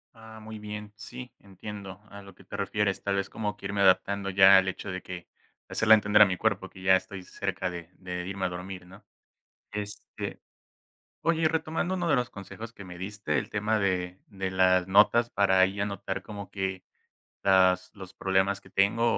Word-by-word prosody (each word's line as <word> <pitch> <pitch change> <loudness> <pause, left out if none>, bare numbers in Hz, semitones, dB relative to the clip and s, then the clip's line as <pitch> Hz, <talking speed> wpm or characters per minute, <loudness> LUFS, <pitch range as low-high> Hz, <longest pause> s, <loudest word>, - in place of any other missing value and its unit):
Ah 110 0 -12
muy 110 0 -9
bien, 105 0 -7
sí, 125 +3 -9
entiendo 100 -1 -9
a 100 - -9
lo 100 -2 -14
que 95 - -18
te 95 - -9
refieres, 100 0 -1
tal 100 -1 -1
vez 100 0 -2
como 105 -2 -3
que - - -12
irme 100 0 -1
adaptando 95 +1 +3
ya 95 0 +8
al 95 - -1
hecho 95 +1 -4
de 95 0 -5
que, 90 -1 -8 0.4
hacerla 110 0 +5
entender 105 0 +4
a - - +11
mi 90 -1 -2
cuerpo 100 -3 0
que 95 - -13
ya 95 0 +6
estoy 95 0 -4
cerca 90 -1 -3
de 85 -1 -8
de 90 -1 -5
irme 95 -1 -3
a - - 0
dormir, 90 +1 -7
¿no? 95 +3 -15 0.7
Este 105 0 -6 0.8
oye, 165 -1 +2
y - - +2
retomando 165 +3 -1
uno 175 -2 -1
de - - +5
los 125 -2 0
consejos 110 +3 -9
que 100 -4 -12
me 90 -1 -9
diste, 95 -5 -3
el - - -2
tema 105 +1 0
de 90 -2 -1
de 95 -3 -4
las 95 -1 +3
notas 105 +5 +5
para 95 -2 +3
ahí 95 +1 +3
anotar 100 -1 -3
como 100 -1 -8
que 95 -1 -3 0.6
las 95 -1 +4
los 95 -2 -11
problemas 95 +1 +1
que - - -19
tengo 100 +4 +2
100 Hz, 195 wpm, -28 LUFS, 95-105 Hz, 0.8 s, a